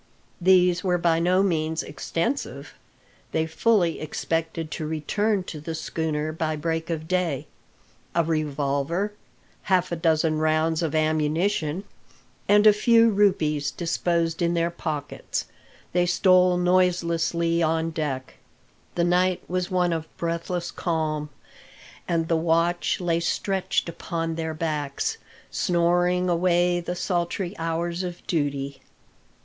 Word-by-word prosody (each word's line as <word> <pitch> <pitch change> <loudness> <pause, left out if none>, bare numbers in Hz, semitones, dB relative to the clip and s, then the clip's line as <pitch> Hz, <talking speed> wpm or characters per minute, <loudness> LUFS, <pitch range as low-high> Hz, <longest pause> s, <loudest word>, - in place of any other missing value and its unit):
These 180 -1 +4
were 180 -2 +2
by 170 -1 +2
no 180 +3 +3
means 160 -3 0
extensive: 170 - -3 0.6
they 160 0 +1
fully 170 +1 +2
expected 165 +1 -3
to 155 - -4
return 195 +6 0
to 155 -4 -7
the 160 +2 -5
schooner 155 -1 -2
by 155 0 -2
break 160 +2 -2
of 160 -1 -3
day. 180 -7 0 0.7
A 170 - +4
revolver, 155 +4 -1 0.6
half 185 -2 +2
a - - 0
dozen 160 -1 +1
rounds 155 +1 +1
of 160 -2 -1
ammunition, 155 +3 +1 0.7
and 205 +1 +6
a 215 - +9
few 230 +2 +5
rupees 160 -8 +2
disposed 170 +1 -1
in 170 0 +2
their 170 0 +1
pockets, 155 -4 -4 0.5
they 175 0 +2
stole 180 0 +4
noiselessly 170 -2 +2
on 165 0 +1
deck. 140 -5 -4 0.6
The 170 - +2
night 180 +1 +2
was 180 0 -2
one 180 -2 +1
of 160 -1 -3
breathless 170 +1 -2
calm, 155 -3 -2 0.8
and 165 -2 0
the 165 - +2
watch 165 +2 +1
lay 170 -2 +1
stretched 190 +3 -1
upon 165 0 -3
their 160 -1 -3
backs, 150 -3 -2 0.3
snoring 175 +1 +2
away 175 0 +2
the 175 +1 -4
sultry 175 +1 -2
hours 170 +2 -2
of 180 -1 -6
duty. 140 -4 -2
170 Hz, 125 wpm, -25 LUFS, 160-180 Hz, 0.8 s, a